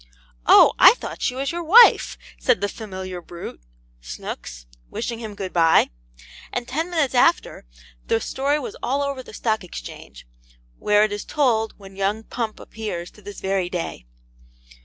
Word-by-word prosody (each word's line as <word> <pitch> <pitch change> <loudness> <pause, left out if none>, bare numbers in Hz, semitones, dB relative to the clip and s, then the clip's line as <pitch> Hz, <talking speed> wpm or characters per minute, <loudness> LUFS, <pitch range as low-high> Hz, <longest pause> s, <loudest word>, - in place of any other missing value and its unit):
'OH, - - +8
I - - +9
THOUGHT - - -8
SHE 250 - 0
WAS 275 +1 -2
YOUR 345 0 -4
WIFE!' 445 +9 +6 0.2
said 250 -6 +2
the 205 - 0
familiar 190 -4 -7
brute, 170 - -9 0.4
Snooks, - - -8 0.2
wishing 230 - -4
him 220 -3 -7
good 195 -3 -6
bye; 165 - +4 0.6
and 245 -1 -4
ten 320 +5 -2
minutes 315 -7 0
after, 255 - +2 0.4
the 225 - +2
story 275 +5 -1
was 290 - -6
all 280 +3 0
over 280 -2 -3
the - - -13
Stock 220 -3 -1
Exchange, 180 - -10 0.5
where 210 0 +3
it 215 - 0
is 205 0 -4
told, 230 -7 0
when 195 -1 -14
young 200 +3 -1
Pump 225 -2 -4
appears, 195 -6 -6
to 210 - -18
this 205 0 -10
very 190 -2 -1
day. 165 - -5
215 Hz, 160 wpm, -22 LUFS, 190-260 Hz, 0.6 s, I